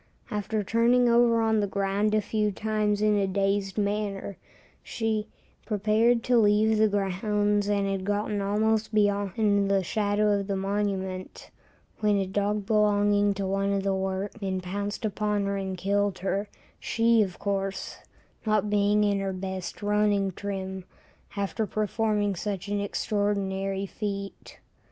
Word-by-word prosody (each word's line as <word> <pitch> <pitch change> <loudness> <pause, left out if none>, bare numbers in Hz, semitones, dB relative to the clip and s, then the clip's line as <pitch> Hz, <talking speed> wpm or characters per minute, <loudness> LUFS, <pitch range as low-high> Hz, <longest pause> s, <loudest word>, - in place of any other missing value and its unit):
After 210 +1 -2
turning 235 +4 +3
over 235 -1 +4
on 220 -1 +2
the 205 - +1
ground 200 +2 0
a 215 - +3
few 210 0 0
times 210 0 0
in 210 0 +4
a 200 -1 +1
dazed 195 +1 0
manner, 200 -1 -2 0.5
she 220 -1 -2 0.4
prepared 220 +3 +2
to 245 -2 +3
leave 215 +1 +3
the 220 - +5
grounds 205 +1 0
and 200 -1 +1
had 195 -1 -2
gotten 205 +1 -1
almost 215 +2 0
beyond 205 0 +2
the 195 -1 +2
shadow 210 +2 +1
of 200 - -5
the 200 - -1
monument, 190 -1 -3 0.5
when 210 -1 +2
a 195 - 0
dog 205 +2 -1
belonging 205 -1 +3
to 195 0 -3
one 195 +1 0
of 200 -1 0
the 195 0 +1
workmen 190 +1 -2
pounced 200 +4 -4
upon 210 -1 -1
her 200 0 -1
and 190 -1 -3
killed 200 +1 0
her, 195 +2 -2 0.3
she, 230 0 +3
of 190 -4 -2
course, 195 -1 -3 0.5
not 215 -2 +1
being 205 0 +3
in 200 -1 +1
her 195 0 -2
best 190 +1 -5
running 205 -1 +2
trim, 190 -1 -5 0.5
after 205 +2 -2
performing 210 -1 0
such 195 +1 -4
an 205 0 0
extraordinary 195 -1 -1
feat. 200 0 -6
205 Hz, 145 wpm, -27 LUFS, 195-210 Hz, 0.5 s, the